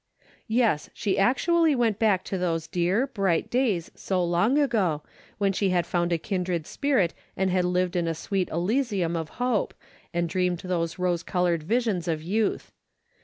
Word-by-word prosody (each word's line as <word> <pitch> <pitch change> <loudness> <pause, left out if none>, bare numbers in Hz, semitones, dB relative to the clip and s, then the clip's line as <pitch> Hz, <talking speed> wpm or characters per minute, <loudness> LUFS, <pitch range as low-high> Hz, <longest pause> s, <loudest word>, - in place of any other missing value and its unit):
Yes, 225 -10 +1
she 195 -3 0
actually 315 - +3
went 230 -5 +1
back 205 -5 +3
to 195 - -3
those 165 -3 -1
dear, 180 +8 +1
bright 195 -10 0
days 230 -10 0
so 185 -2 -1
long 175 +10 +2
ago, 205 - +1 0.3
when 200 -1 +1
she 195 +1 +1
had 175 -2 +1
found 175 0 0
a 170 - +3
kindred 180 -2 -2
spirit 255 - +1 0.2
and 190 0 +1
had 180 -1 +2
lived 180 0 0
in 170 -1 +1
a 165 - -1
sweet 190 +3 -2
elysium 190 - 0
of 160 -2 -3
hope, 245 -4 0 0.4
and 170 0 0
dreamed 180 +1 0
those 175 -3 -2
rose 180 -2 0
colored 175 -3 0
visions 210 -1 0
of 160 -2 -1
youth. 210 +5 -1
185 Hz, 170 wpm, -26 LUFS, 170-220 Hz, 0.4 s, actually